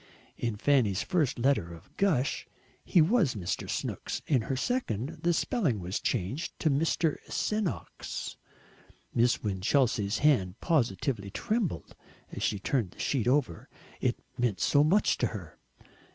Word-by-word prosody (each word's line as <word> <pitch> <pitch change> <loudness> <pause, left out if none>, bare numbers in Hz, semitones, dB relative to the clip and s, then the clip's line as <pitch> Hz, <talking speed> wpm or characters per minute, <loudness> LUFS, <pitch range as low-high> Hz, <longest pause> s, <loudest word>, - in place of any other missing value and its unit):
In 115 -3 -2
Fanny's 110 -7 +2
first 160 -9 +1
letter 120 -9 +1
of 80 - -18
gush 155 -10 +1 0.4
he 170 - +5
was 180 - +2
Mr. 95 -4 -3
"Snooks," - - -3
in 135 -6 +2
her 130 +4 -2
second 155 - -2
the 175 - +2
spelling 165 - 0
was 90 +2 -3
changed 120 - -2
to 155 - +1
Mr. 155 +2 +1
"Senoks." 210 -4 -3 0.8
Miss 120 +1 +2
Winchelsea's 105 +1 +1
hand 105 -10 +2
positively 115 - 0
trembled 210 - -2 0.4
as - - -6
she 105 - +1
turned 110 0 0
the - - -19
sheet 125 -5 0
over 125 - +1 0.3
it 125 -2 0 0.2
meant 115 -7 +1
so 145 +9 +4
much 185 +8 +3
to - - +2
her. - - -8
130 Hz, 140 wpm, -29 LUFS, 105-160 Hz, 0.8 s, he